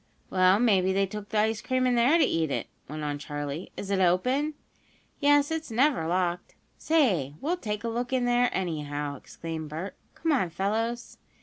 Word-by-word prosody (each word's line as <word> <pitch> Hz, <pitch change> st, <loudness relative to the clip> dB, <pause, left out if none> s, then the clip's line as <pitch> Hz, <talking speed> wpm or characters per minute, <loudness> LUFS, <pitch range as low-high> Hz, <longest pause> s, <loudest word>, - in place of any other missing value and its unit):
"Well, 185 Hz, +1 st, +5 dB
maybe 190 Hz, -6 st, +3 dB
they 195 Hz, +1 st, +2 dB
took 205 Hz, +1 st, -7 dB
the 220 Hz, -, -1 dB
ice 220 Hz, +1 st, +1 dB
cream 255 Hz, 0 st, 0 dB
in 250 Hz, -, +3 dB
there 245 Hz, +7 st, +4 dB
to 335 Hz, -, +4 dB
eat 160 Hz, -2 st, 0 dB
it," -, -, -2 dB, 0.2 s
went 155 Hz, +1 st, -5 dB
on 145 Hz, -1 st, -2 dB
Charley. 145 Hz, +2 st, -5 dB
"Is 200 Hz, -, -5 dB
it 195 Hz, -, +2 dB
open?" 250 Hz, -, +2 dB, 0.6 s
"Yes, 290 Hz, 0 st, +4 dB
it's 320 Hz, -2 st, -3 dB
never 245 Hz, -, +2 dB
locked. 175 Hz, 0 st, -1 dB, 0.2 s
Say, 195 Hz, -, +2 dB
we'll 330 Hz, +6 st, 0 dB
take 210 Hz, -7 st, -4 dB
a -, -, -2 dB
look 240 Hz, +2 st, -2 dB
in 255 Hz, -2 st, +1 dB
there, 245 Hz, 0 st, +3 dB
anyhow!" 150 Hz, -5 st, -3 dB
exclaimed 160 Hz, +2 st, -7 dB
Bert. 165 Hz, +6 st, -5 dB, 0.2 s
"Come 325 Hz, -, -1 dB
on, 245 Hz, -, +2 dB
fellows!" 225 Hz, +7 st, -2 dB
205 Hz, 185 wpm, -27 LUFS, 165-250 Hz, 0.6 s, Well